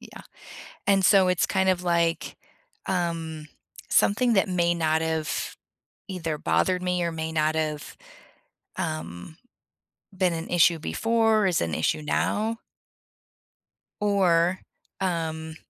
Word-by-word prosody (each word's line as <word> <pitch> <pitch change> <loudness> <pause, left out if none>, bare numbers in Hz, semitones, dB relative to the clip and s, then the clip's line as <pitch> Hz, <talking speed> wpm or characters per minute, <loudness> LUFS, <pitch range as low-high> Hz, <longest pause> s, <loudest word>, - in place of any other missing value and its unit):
yeah, - - -12 0.6
and 195 -1 +3
so 190 -3 +5
it's 180 - +2
kind 190 -1 +1
of 180 -1 0
like, 170 -1 0 0.5
um, 165 -4 -3 0.4
something 235 +3 +3
that 195 -1 +2
may 175 -1 +2
not 160 -1 +1
have 160 -1 -2 0.5
either 165 -5 -3
bothered 180 +4 +1
me, 180 0 0
or 170 - -2
may 160 0 -4
not 155 0 +1
have, 155 -1 -3 0.8
um, 85 - -5 0.8
been 180 -2 +1
an 165 0 -5
issue 170 -1 +4
before, 225 +3 +1
is 175 - +1
an 80 -2 -2
issue 80 - 0
now 220 +8 -1 1.4
or, 185 -3 +2 0.4
um 160 -3 -2
170 Hz, 120 wpm, -25 LUFS, 160-190 Hz, 1.4 s, so